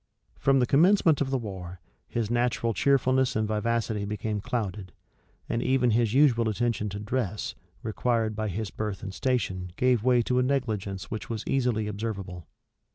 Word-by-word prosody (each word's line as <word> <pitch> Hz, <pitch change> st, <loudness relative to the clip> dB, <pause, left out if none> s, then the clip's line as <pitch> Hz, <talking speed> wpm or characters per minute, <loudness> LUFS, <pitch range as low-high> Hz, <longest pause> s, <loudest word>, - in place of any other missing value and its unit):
From 135 Hz, 0 st, +3 dB
the 125 Hz, -, +4 dB
commencement 165 Hz, +2 st, +4 dB
of 135 Hz, -, +1 dB
the 135 Hz, -, +1 dB
war, 95 Hz, -6 st, -7 dB, 0.3 s
his 115 Hz, -2 st, -2 dB
natural 120 Hz, -1 st, +1 dB
cheerfulness 130 Hz, 0 st, +2 dB
and 110 Hz, 0 st, +1 dB
vivacity 110 Hz, -1 st, -1 dB
became 105 Hz, 0 st, -3 dB
clouded; 100 Hz, -5 st, -3 dB, 0.5 s
and 115 Hz, -, -1 dB
even 125 Hz, -2 st, +2 dB
his 115 Hz, -1 st, +2 dB
usual 120 Hz, -4 st, +4 dB
attention 110 Hz, -1 st, -1 dB
to 100 Hz, +1 st, -5 dB
dress, 105 Hz, -2 st, -2 dB, 0.3 s
required 110 Hz, -1 st, 0 dB
by 110 Hz, 0 st, -2 dB
his 105 Hz, +1 st, -3 dB
birth 105 Hz, -3 st, -4 dB
and 95 Hz, -, -5 dB
station 95 Hz, -9 st, -1 dB
gave 125 Hz, -1 st, +2 dB
way 125 Hz, -1 st, +4 dB
to 125 Hz, +2 st, +1 dB
a -, -, +4 dB
negligence 110 Hz, -8 st, -2 dB
which 110 Hz, -, -5 dB
was 115 Hz, -2 st, -3 dB
easily 125 Hz, -5 st, +1 dB
observable. 100 Hz, -5 st, -5 dB
115 Hz, 160 wpm, -27 LUFS, 105-125 Hz, 0.5 s, the